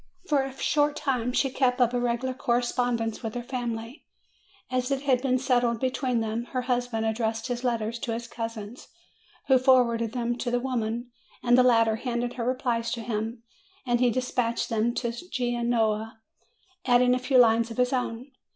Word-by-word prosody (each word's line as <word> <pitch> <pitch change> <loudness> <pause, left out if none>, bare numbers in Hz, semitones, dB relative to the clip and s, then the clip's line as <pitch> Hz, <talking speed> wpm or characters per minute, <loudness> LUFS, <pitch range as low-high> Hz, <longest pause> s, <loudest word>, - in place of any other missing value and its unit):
For 290 -3 +3
a 270 0 -7
short 295 0 +1
time 250 -3 -1
she 270 +1 +1
kept 255 -1 +1
up 245 -1 +3
a 245 - +1
regular 245 +2 -1
correspondence 240 -2 0
with 225 -2 -5
her 240 - -3
family. 240 +1 -5 0.7
As 255 0 0
it 275 0 -1
had 260 -3 +2
been 255 -1 +2
settled 245 -3 +1
between 255 -2 0
them, 225 +2 -2
her 255 -1 -1
husband 245 -3 -1
addressed 225 0 -1
his 245 0 -3
letters 235 -2 -1
to 235 -3 -3
his 235 +1 -5
cousin, 230 -1 -6 0.7
who 265 -2 +5
forwarded 235 -3 +3
them 240 -1 -2
to 245 - -2
the 245 0 +1
woman, 240 -1 -3 0.3
and 240 0 +5
the 255 - +6
latter 230 -3 +4
handed 240 0 -2
her 240 - -4
replies 240 -2 0
to 235 - -4
him, 225 +1 -4 0.4
and 240 -1 +1
he 250 0 +4
dispatched 245 -1 -1
them 230 +1 0
to 235 -2 -1 0.2
Genoa, 235 -4 0 0.6
adding 250 0 +4
a 250 - +1
few 255 +1 +2
lines 230 -1 +5
of 230 - -8
his 250 +1 +2
own. 250 +1 -3
240 Hz, 180 wpm, -27 LUFS, 230-255 Hz, 0.7 s, the